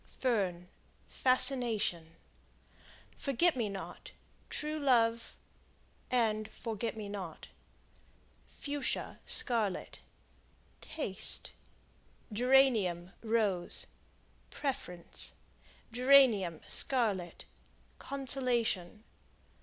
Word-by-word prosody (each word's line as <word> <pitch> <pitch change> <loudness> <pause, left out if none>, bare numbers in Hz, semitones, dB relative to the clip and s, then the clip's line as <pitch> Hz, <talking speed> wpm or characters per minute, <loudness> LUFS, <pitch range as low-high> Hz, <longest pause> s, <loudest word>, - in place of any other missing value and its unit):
Fern 190 -8 -1 0.4
Fascination. 240 -10 +2 1.0
Forget 280 +5 +1
me 230 -5 -2
not 195 -1 -8 0.4
True 305 +1 -4
love, 235 -4 +1 0.7
Forget 220 -1 -2
me 210 -2 -6
not. 190 -5 -8 1.1
Fuschia, 290 0 -4
Scarlet 225 -7 +2 0.8
Taste. 200 -12 -2 0.8
Geranium, 220 -8 +2
Rose 215 -6 0 0.6
Preference. 180 - -3 0.6
Geranium, 240 - +4
Scarlet 205 -10 +3 0.5
Consolation. 240 -8 -1
230 Hz, 60 wpm, -32 LUFS, 195-255 Hz, 1.1 s, Geranium